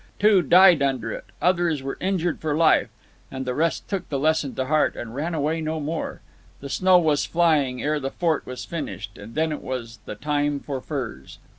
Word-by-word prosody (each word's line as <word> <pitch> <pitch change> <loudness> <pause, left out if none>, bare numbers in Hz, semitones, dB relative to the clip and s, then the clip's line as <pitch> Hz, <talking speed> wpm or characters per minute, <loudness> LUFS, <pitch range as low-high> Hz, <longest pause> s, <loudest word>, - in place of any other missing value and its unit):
Two 205 -2 +5
died 175 0 +6
under 130 -5 0
it; - - -6 0.2
others 175 -5 +2
were 135 - -5
injured 180 -3 0
for 155 -2 -1
life; 165 -1 +4 0.4
and 130 0 -5
the 125 - -1
rest 165 +4 -1
took 195 -3 -4
the 140 - -1
lesson 155 -1 +1
to 130 - -1
heart 155 +3 +2
and 115 -1 -7
ran 160 +6 -3
away 155 +2 -1
no 160 0 -2
more. 155 +2 -4 0.4
The 140 - -8
snow 185 +4 +4
was 155 -4 +2
flying 150 -7 +2
ere 150 +1 0
the 135 -1 -3
fort 160 0 0
was 125 0 -6
finished, 105 - -6
and 105 +3 -11
then 160 0 +1
it 150 - -4
was 120 -3 -6
the - - -6
time 145 +3 -1
for 135 -2 -5
furs. 120 - -6
150 Hz, 200 wpm, -24 LUFS, 130-165 Hz, 0.4 s, died